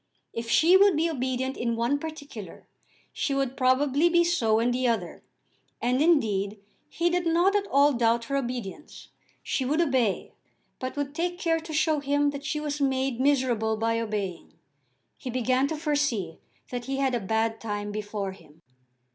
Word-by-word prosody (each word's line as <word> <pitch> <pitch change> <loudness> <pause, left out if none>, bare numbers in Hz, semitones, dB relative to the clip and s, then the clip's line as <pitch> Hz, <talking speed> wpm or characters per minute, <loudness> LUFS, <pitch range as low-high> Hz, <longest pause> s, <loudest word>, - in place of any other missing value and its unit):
If 230 0 -5
she 335 +9 +5
would 395 -1 +6
be 320 +2 +2
obedient 260 -3 -2
in 235 -1 -1
one 240 +5 0
particular, 285 - -8 0.5
she 275 - -1
would 270 -1 -1
probably 270 +5 +3
be 345 0 +4
so 235 -11 +2
in 240 +2 +2
the 250 +1 0
other; 230 -2 -2 0.6
and, 250 +3 +1
indeed, 215 - +2 0.3
he 340 +2 0
did 350 -1 0
not 350 +5 +3
at 405 -1 +1
all 285 -1 +4
doubt 230 -1 +2
her 275 - -3
obedience. 245 -1 -5 0.3
She 265 - -1
would 290 +5 0
obey, 260 - +1 0.5
but 255 0 -4
would 285 -1 -2
take 350 +3 -2
care 330 -2 +1
to 325 0 -9
show 310 0 +2
him 285 +1 +1
that 280 0 -7
she 300 - -2
was 295 -1 -3
made 265 -2 0
miserable 250 -5 +1
by 230 +1 0
obeying. 205 -6 -4 0.6
He 255 - -7
began 255 +2 +1
to 315 - -3
foresee 290 - -1 0.3
that 245 -1 -4
he 270 +1 -2
had 270 -1 +1
a 240 - +1
bad 220 +2 -1
time 205 -2 -4
before 205 -1 -4
him. 165 -3 -18
260 Hz, 170 wpm, -27 LUFS, 230-300 Hz, 0.6 s, would